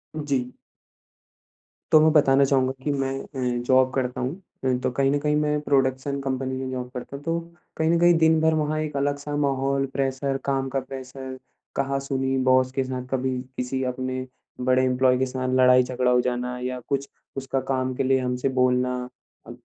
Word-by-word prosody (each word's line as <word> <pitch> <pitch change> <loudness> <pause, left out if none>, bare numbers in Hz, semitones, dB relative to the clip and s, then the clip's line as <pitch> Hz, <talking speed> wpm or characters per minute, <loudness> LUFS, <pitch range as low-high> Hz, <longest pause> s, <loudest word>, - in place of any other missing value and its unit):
जी। 135 -5 -2 1.4
तो 155 - +8
मैं 155 0 +5
बताना 140 -2 +5
चाहूँगा 130 -1 +2
कि 145 - 0
मैं 135 -1 -1
अ, 125 -3 -3
जॉब 130 0 +4
करता 125 -1 -2
हूँ। 130 +7 -2 0.3
अ, 130 - +3
तो 130 - +1
कहीं 135 +2 +1
न 145 - +1
कहीं 150 0 +1
मैं 150 0 +1
प्रोडक्शन 135 0 0
कंपनी 130 -1 -2
में 130 - -4
जॉब 125 -1 -4
करता 125 +2 -7
हूँ। 140 - -9
तो 165 +1 0 0.4
कहीं 160 0 +1
न 170 0 +3
कहीं 175 0 +6
दिन 160 0 +4
भर 160 0 +3
वहाँ 155 0 0
एक 150 -2 -4
अलग 145 +1 0
सा 145 0 -5
माहौल 135 -1 +1
प्रेशर 135 0 -1
काम 135 -1 0
का 135 - -1
प्रेशर, 130 0 -8 0.4
कहा-सुनी 135 -1 -1
बॉस 130 0 +4
के 135 0 -1
साथ 130 -1 -4
कभी 130 -1 0 0.2
किसी 130 +1 -2
अपने 130 0 -3 0.4
बड़े 130 +1 +3
एम्प्लॉयी 125 0 +3
के 130 - +2
साथ 130 0 -3
लड़ाई-झगड़ा 125 0 +4
हो 125 0 +4
जाना 125 0 -2
या 125 0 -3
कुछ 140 -1 -1 0.3
उसका 135 0 -1
काम 130 -1 0
के - - 0
लिए 130 0 +3
हमसे 125 +1 -1
बोलना 125 0 +2 0.5
अ, - - -8
130 Hz, 185 wpm, -24 LUFS, 130-140 Hz, 1.4 s, तो